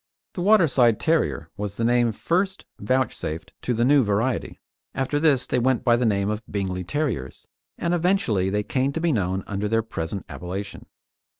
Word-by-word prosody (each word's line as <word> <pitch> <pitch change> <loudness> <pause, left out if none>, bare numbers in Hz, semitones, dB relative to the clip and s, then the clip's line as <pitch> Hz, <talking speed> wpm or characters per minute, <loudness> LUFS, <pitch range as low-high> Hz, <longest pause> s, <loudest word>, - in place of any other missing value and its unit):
The 180 - -4
Waterside 155 - +4
Terrier 160 0 0
was 100 -1 -4
the 115 - -1
name 120 0 +3
first 185 - -1
vouchsafed 105 -8 -2
to - - -2
the 120 +1 +2
new 140 0 +5
variety. 110 +5 -1 0.4
After 135 +2 0
this 145 -5 +3
they 125 - 0
went 130 0 +1
by 120 -2 +4
the 120 0 +1
name 100 -2 +1
of 105 +1 -2
Bingley 95 -2 -2
Terriers, 95 - -3 0.3
and 170 0 -1
eventually 170 - +1
they 105 +1 0
came 135 +5 0
to 165 - -2
be 170 0 +1
known 95 -5 -1
under 100 +1 -2
their 115 +1 +1
present 90 -3 -5
appellation. 90 +7 -6
115 Hz, 175 wpm, -24 LUFS, 100-145 Hz, 0.4 s, new